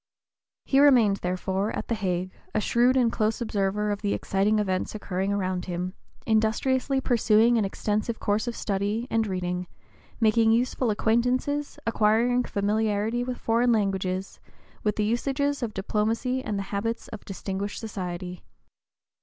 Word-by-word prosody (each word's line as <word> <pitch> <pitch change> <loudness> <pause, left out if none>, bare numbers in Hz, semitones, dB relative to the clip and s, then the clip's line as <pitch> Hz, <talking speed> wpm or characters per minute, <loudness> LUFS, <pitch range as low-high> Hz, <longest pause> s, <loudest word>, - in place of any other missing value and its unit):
He 270 - +3
remained, 245 -8 +6
therefore, 190 +3 -1
at - - -4
the - - 0
Hague, 185 -4 -2 0.2
a - - +3
shrewd 245 +4 +3
and 240 -3 +3
close 220 -1 0
observer 210 -2 0
of 205 - -3
the 205 -2 0
exciting 200 +3 +1
events 190 -1 -1
occurring 195 -1 -2
around 185 -3 -1
him, 180 0 -3 0.3
industriously 250 +5 +1
pursuing 235 -2 +3
an 210 - +1
extensive 215 +3 -2
course 210 +4 0
of 235 - -3
study 205 +3 -1
and 225 -1 +1
reading, 180 -1 -2 0.5
making 225 0 +4
useful 245 +1 +1
acquaintances, 250 +7 0
acquiring 230 +3 +2
familiarity 215 +3 0
with 250 0 -4
foreign 235 +2 +2
languages, 190 -3 -1 0.4
with 210 -1 0
the 210 - 0
usages 275 +5 0
of 235 -3 -2
diplomacy 225 +6 -1
and 210 -2 -2
the 195 - -2
habits 225 +3 -2
of - - -8
distinguished 195 +1 -4
society. 180 -5 -5
215 Hz, 145 wpm, -26 LUFS, 195-235 Hz, 0.5 s, remained